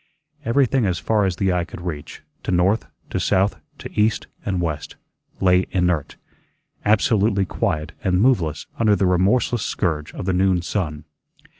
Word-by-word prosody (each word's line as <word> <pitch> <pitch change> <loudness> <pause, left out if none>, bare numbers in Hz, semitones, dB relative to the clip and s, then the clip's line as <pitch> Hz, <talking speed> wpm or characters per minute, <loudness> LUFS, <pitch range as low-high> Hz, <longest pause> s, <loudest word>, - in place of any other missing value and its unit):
Everything 130 -2 +2
as 90 -2 0
far 105 +6 +1
as 95 -2 0
the 95 0 +1
eye 90 -1 +1
could 85 - -9
reach, 80 -5 -6 0.2
to - - -7
north, 95 +5 +2 0.2
to - - -1
south, 95 +1 +2 0.2
to - - -8
east, 105 +1 +1 0.2
and 95 -3 -1
west, 80 -4 -3 0.4
lay 90 0 +3
inert, 90 -6 0 0.7
absolutely 105 -1 +3
quiet 85 -6 -2
and 90 -1 +2
moveless 90 - +2
under 110 -2 +4
the 95 - +1
remorseless 100 +6 +2
scourge 80 -8 -1
of - - -5
the 95 - +1
noon 90 -1 +2
sun. 80 -6 -3
95 Hz, 155 wpm, -22 LUFS, 85-105 Hz, 0.7 s, under